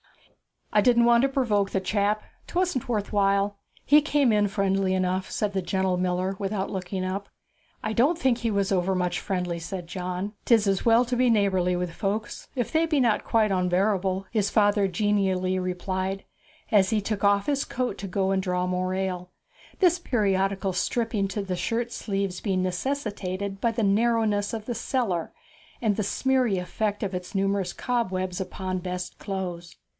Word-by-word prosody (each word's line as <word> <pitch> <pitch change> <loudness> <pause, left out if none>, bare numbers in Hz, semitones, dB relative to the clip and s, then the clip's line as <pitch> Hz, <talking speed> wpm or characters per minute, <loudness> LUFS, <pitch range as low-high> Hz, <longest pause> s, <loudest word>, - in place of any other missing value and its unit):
'I 210 - +5
didn't 235 +1 +4
want 235 0 +5
to 275 - +3
provoke 215 -7 +1
the 195 - 0
chap 205 +2 0 0.2
'twasn't 360 -8 -1
worth 215 -4 -1
while. 200 0 +2 0.3
He 295 +2 +6
came 290 -4 +2
in 210 -1 +3
friendly 195 -1 +1
enough,' 185 0 -1
said 210 -2 -1
the 190 - 0
gentle 190 0 0
miller 180 +1 0
without 195 0 -2
looking 185 0 -3
up. 195 +2 -3 0.6
'I 220 - -1
don't 280 +10 +3
think 260 -6 +1
he 230 -1 -1
was 200 -2 0
overmuch 180 -1 +1
friendly,' 180 -3 -2
said 180 +1 -5
John. 180 +3 -4
''Tis 225 -4 +4
as 195 -1 +1
well 230 +1 +6
to 245 +1 -2
be 250 0 +4
neighbourly 190 -5 +2
with 180 -1 -2
folks, 205 +4 -3
if 245 -3 -2
they 320 +1 +3
be 305 -3 +2
not 230 -4 +2
quite 220 -2 +2
onbearable,' 190 +1 +1
his 210 -3 +1
father 205 -1 +3
genially 190 -1 +1
replied, 185 +1 -2 0.5
as 195 -4 +5
he 215 -1 +1
took 205 0 -3
off 200 0 +3
his 285 -1 +1
coat 250 -4 -2
to 195 - -5
go 190 +1 0
and 190 0 +1
draw 180 -1 -1
more 185 0 -1
ale 180 -1 -3 0.5
this 360 -2 +4
periodical 195 - 0
stripping 220 +1 0
to 200 +1 -3
the 185 -2 -3
shirt 235 +4 -1
sleeves 195 -5 -2
being 190 -3 0
necessitated 195 -2 -3
by 235 - +2
the 225 0 -1
narrowness 210 0 +2
of 220 -2 -4
the 240 - -2
cellar 225 -7 -1 0.5
and 215 -4 +2
the - - +1
smeary 250 0 +1
effect 205 +4 -2
of 195 -1 -2
its 180 +2 -6
numerous 195 -2 0
cobwebs 185 -7 -2
upon 185 0 -3
best 180 0 -5
clothes. 180 -4 -5
195 Hz, 175 wpm, -26 LUFS, 185-220 Hz, 0.6 s, He